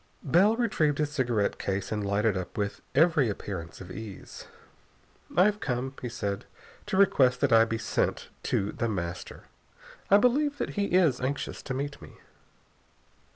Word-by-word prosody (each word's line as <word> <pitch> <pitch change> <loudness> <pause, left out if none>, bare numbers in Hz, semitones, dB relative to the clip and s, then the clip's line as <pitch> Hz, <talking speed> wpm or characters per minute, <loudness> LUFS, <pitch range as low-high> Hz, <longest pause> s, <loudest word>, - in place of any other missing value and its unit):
Bell 185 +10 +4
retrieved 160 -12 +1
his 150 -1 -1
cigarette 120 -8 0
case 95 0 -2
and 105 -1 -1
lighted 100 +1 +1
up 90 -2 -5
with 100 -1 -2
every 150 -4 +4
appearance 90 -4 -6
of 95 0 -9
ease. 100 0 -9 0.9
"I 180 - +7
have 210 0 +1
come," 130 -2 -2
he 125 - -4
said 100 -3 -3
casually, - - -26 0.2
"to 200 -2 -1
request 130 -10 +4
that 140 -4 +3
I 115 0 +7
be 115 0 -2
sent 110 - -1 0.2
to 100 +1 0
The 115 - -2
Master. 90 -4 -5 0.7
I 200 - +8
believe 285 +6 +2
that - - -3
he 205 -1 -1
is 170 -10 +3
anxious 135 +2 -3
to 130 - -4
meet 140 +1 -4
me." - - -12
125 Hz, 165 wpm, -28 LUFS, 100-170 Hz, 0.9 s, I